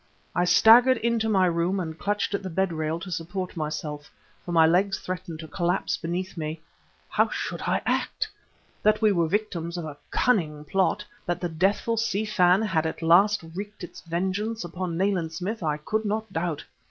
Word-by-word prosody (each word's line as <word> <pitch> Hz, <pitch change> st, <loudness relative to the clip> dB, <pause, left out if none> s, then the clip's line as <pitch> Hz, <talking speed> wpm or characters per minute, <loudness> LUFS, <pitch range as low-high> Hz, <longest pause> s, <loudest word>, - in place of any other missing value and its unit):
I 175 Hz, -, +2 dB
staggered 235 Hz, +8 st, +7 dB
into 230 Hz, -1 st, 0 dB
my 190 Hz, -3 st, +4 dB
room 175 Hz, +2 st, +1 dB
and 160 Hz, -3 st, -4 dB
clutched 205 Hz, +4 st, -1 dB
at 200 Hz, -, -1 dB
the 190 Hz, -, -5 dB
bed 190 Hz, +1 st, 0 dB
rail 160 Hz, +1 st, -2 dB
to 185 Hz, -, -7 dB
support 180 Hz, +3 st, -4 dB
myself, 150 Hz, -2 st, -4 dB, 0.3 s
for 175 Hz, -, -6 dB
my 165 Hz, -1 st, +6 dB
legs 190 Hz, +4 st, +3 dB
threatened 180 Hz, -3 st, -5 dB
to 160 Hz, -, -8 dB
collapse 170 Hz, +4 st, 0 dB
beneath 180 Hz, +3 st, -4 dB
me. 155 Hz, -1 st, -4 dB, 0.5 s
How -, -, +2 dB
should -, -, -4 dB
I -, -, +1 dB
act? 435 Hz, -, 0 dB, 0.5 s
That 215 Hz, +1 st, +3 dB
we 215 Hz, -, +6 dB
were 170 Hz, -4 st, +2 dB
victims 175 Hz, -3 st, -2 dB
of 170 Hz, -, -4 dB
a 150 Hz, -2 st, -7 dB
cunning 155 Hz, -11 st, +1 dB
plot, 195 Hz, +5 st, +1 dB, 0.2 s
that 175 Hz, -, -1 dB
the 175 Hz, -, -2 dB
deathful 195 Hz, +7 st, +1 dB
Si 220 Hz, -2 st, 0 dB
Fan 185 Hz, -1 st, +4 dB
had 165 Hz, -7 st, +1 dB
at 160 Hz, -, -5 dB
last 195 Hz, +4 st, +5 dB
wreaked 205 Hz, +2 st, -7 dB
its 175 Hz, -, -9 dB
vengeance 190 Hz, +6 st, -2 dB
upon 175 Hz, 0 st, -4 dB
Nayland 185 Hz, -4 st, 0 dB
Smith 190 Hz, +6 st, -4 dB
I 150 Hz, -3 st, 0 dB
could 215 Hz, +8 st, -2 dB
not 215 Hz, -1 st, -2 dB
doubt. 165 Hz, -3 st, -2 dB
180 Hz, 185 wpm, -26 LUFS, 165-205 Hz, 0.5 s, staggered